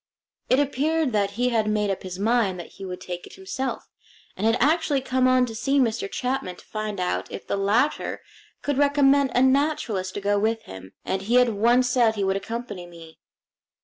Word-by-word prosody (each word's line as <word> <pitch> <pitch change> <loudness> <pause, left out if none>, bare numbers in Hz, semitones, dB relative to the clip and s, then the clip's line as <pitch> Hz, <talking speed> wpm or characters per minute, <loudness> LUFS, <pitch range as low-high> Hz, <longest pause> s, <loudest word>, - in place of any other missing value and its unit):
It 255 - +4
appeared 290 +1 +1
that 200 -2 0
he 250 +1 +2
had 225 -3 +1
made 210 -1 +1
up 195 - -4
his 185 -1 -7
mind 205 -3 +1
that 175 - -8
he 195 - -9
would 180 -1 -6
take 175 -1 -7
it - - -14
himself, 380 -9 -4 0.5
and 210 +4 0
had 225 +2 +3
actually 300 0 +2
come 255 0 +1
on 255 0 +4
to 230 - -7
see 275 +5 0
Mr. 230 -6 +1
Chapman 255 -7 -3
to - - -17
find 215 -2 -4
out 180 0 -2
if - - -7
the - - -1
latter 215 +9 0 0.4
could 285 -1 -1
recommend 280 -1 +4
a 250 - +4
naturalist 260 -9 +1
to - - -2
go 205 0 +1
with 225 +2 0
him; 95 0 -11
and 190 - -1
he 230 +5 +2
at 250 -1 +4
once 240 +4 +3
said 240 -3 +3
he 200 - -1
would 190 0 +1
accompany 205 -2 -5
me. 165 -2 -14
230 Hz, 205 wpm, -24 LUFS, 195-265 Hz, 0.5 s, It